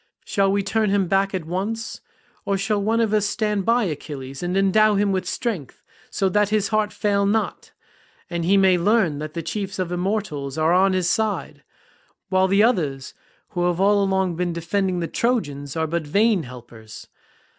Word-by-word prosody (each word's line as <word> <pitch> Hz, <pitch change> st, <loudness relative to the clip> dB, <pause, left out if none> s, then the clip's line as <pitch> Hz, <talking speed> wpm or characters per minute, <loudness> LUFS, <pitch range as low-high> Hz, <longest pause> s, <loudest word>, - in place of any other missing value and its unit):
Shall 195 Hz, -1 st, +1 dB
we 200 Hz, 0 st, +1 dB
turn 215 Hz, +1 st, 0 dB
him 195 Hz, -2 st, +1 dB
back 195 Hz, +1 st, +1 dB
at 180 Hz, -4 st, -4 dB
once, 205 Hz, +7 st, -4 dB, 0.4 s
or 200 Hz, -1 st, 0 dB
shall 205 Hz, +1 st, 0 dB
one 220 Hz, +3 st, +1 dB
of 220 Hz, -2 st, 0 dB
us 210 Hz, -1 st, +2 dB
stand 210 Hz, -2 st, -1 dB
by 235 Hz, +1 st, +3 dB
Achilles 140 Hz, -6 st, -6 dB
and 180 Hz, +2 st, -1 dB
endow 210 Hz, +2 st, +4 dB
him 200 Hz, 0 st, +2 dB
with 185 Hz, -1 st, -1 dB
strength 205 Hz, -, -4 dB, 0.3 s
so 195 Hz, -, 0 dB
that 210 Hz, +2 st, +2 dB
his 210 Hz, -2 st, +1 dB
heart 215 Hz, -1 st, +1 dB
fail 200 Hz, -1 st, 0 dB
not, 220 Hz, +2 st, -1 dB, 0.6 s
and 170 Hz, -1 st, -3 dB
he 195 Hz, +4 st, +3 dB
may 190 Hz, -2 st, +4 dB
learn 190 Hz, -6 st, +2 dB
that 155 Hz, +1 st, -6 dB
the 165 Hz, -, -3 dB
chiefs 200 Hz, +1 st, -4 dB
of 185 Hz, -2 st, -2 dB
the -, -, -4 dB
immortals 175 Hz, -7 st, -2 dB
are 160 Hz, +2 st, +2 dB
on 190 Hz, +1 st, +4 dB
his 185 Hz, -2 st, 0 dB
side, 220 Hz, +2 st, -1 dB, 0.7 s
while 190 Hz, 0 st, +3 dB
the 200 Hz, +2 st, +4 dB
others 150 Hz, -, 0 dB, 0.4 s
who 175 Hz, -1 st, -1 dB
have 175 Hz, 0 st, -1 dB
all 200 Hz, +1 st, +4 dB
along 190 Hz, -2 st, 0 dB
been 175 Hz, 0 st, -1 dB
defending 180 Hz, +2 st, -1 dB
the 165 Hz, -, -2 dB
Trojans 145 Hz, -, -2 dB
are 160 Hz, 0 st, 0 dB
but 160 Hz, -1 st, -3 dB
vain 205 Hz, +4 st, +3 dB
helpers? 120 Hz, -4 st, -11 dB
195 Hz, 190 wpm, -22 LUFS, 170-210 Hz, 0.7 s, endow